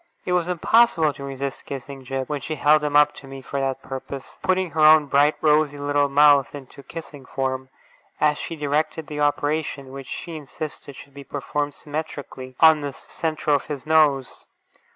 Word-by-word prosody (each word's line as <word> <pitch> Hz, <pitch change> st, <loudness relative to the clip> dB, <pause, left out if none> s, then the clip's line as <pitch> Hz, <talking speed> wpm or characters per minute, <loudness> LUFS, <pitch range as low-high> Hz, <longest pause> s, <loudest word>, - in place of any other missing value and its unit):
It 180 Hz, -, -1 dB
was 175 Hz, -1 st, +1 dB
impossible 180 Hz, -3 st, +3 dB
to 140 Hz, -, -10 dB
resist 135 Hz, 0 st, -5 dB
kissing 135 Hz, 0 st, -7 dB
Jip, 135 Hz, 0 st, -4 dB
when 145 Hz, -2 st, -3 dB
she 155 Hz, +5 st, -4 dB
held 150 Hz, 0 st, +4 dB
him 145 Hz, -1 st, -1 dB
up 150 Hz, 0 st, +5 dB
to 135 Hz, -, -12 dB
me 135 Hz, 0 st, -9 dB
for 140 Hz, -, -4 dB
that 135 Hz, -1 st, -2 dB
purpose, 135 Hz, 0 st, -8 dB
putting 185 Hz, -2 st, 0 dB
her 160 Hz, -, -4 dB
own 155 Hz, 0 st, +7 dB
bright, 145 Hz, +2 st, +3 dB
rosy 150 Hz, -1 st, +3 dB
little 145 Hz, 0 st, +1 dB
mouth 145 Hz, -1 st, +5 dB
into 140 Hz, 0 st, -11 dB
kissing 150 Hz, -2 st, -10 dB
form, 130 Hz, 0 st, -3 dB, 0.5 s
as 150 Hz, -1 st, +2 dB
she 165 Hz, -, -5 dB
directed 150 Hz, +1 st, -1 dB
the 150 Hz, +1 st, -6 dB
operation, 145 Hz, -1 st, -1 dB
which 135 Hz, -1 st, -9 dB
she 170 Hz, -, -6 dB
insisted 145 Hz, -1 st, -8 dB
should 140 Hz, -, -13 dB
be 140 Hz, 0 st, -10 dB
performed 145 Hz, +1 st, -3 dB
symmetrically, 145 Hz, -4 st, -7 dB
on 160 Hz, -2 st, +6 dB
the 145 Hz, -1 st, -4 dB
centre 155 Hz, +1 st, -3 dB
of 140 Hz, -, 0 dB
his 145 Hz, -3 st, -6 dB
nose. 150 Hz, -4 st, +2 dB
145 Hz, 180 wpm, -23 LUFS, 135-155 Hz, 0.5 s, own